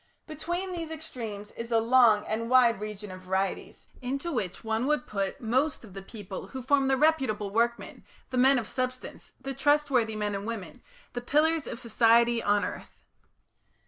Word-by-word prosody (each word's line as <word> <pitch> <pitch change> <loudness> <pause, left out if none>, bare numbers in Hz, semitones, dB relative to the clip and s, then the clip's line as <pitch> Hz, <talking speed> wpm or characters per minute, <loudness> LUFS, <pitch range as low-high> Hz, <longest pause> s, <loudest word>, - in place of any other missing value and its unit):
Between 345 +5 -4
these 335 -3 -4
extremes 230 -10 -7
is 230 +1 -7
a 230 - +4
long 225 -2 +5
and 230 +2 -2
wide 245 -4 +5
region 210 -1 -6
of 185 0 -9
varieties, 190 +1 -3 0.2
into 275 +7 -3
which 205 - -3
one 225 +3 -1
would 300 -4 +1
put 195 +3 -3
most 260 +5 0
of 195 - -14
the 195 - -7
people 195 -1 -8
who 260 -2 -7
form 275 +1 +3
the 265 0 +2
reputable 260 -10 +1
workmen, 235 +2 -1 0.3
the 255 - -2
men 265 +2 +5
of 230 -3 -2
substance, 255 0 -4
the 270 - -5
trustworthy 275 -5 +2
men 210 -1 -2
and 200 +2 -4
women, 230 0 -6 0.3
the 245 - -3
pillars 305 +4 +2
of 230 - -5
society 235 0 +3
on 205 -1 +2
earth. - - -8
235 Hz, 175 wpm, -28 LUFS, 210-270 Hz, 0.3 s, long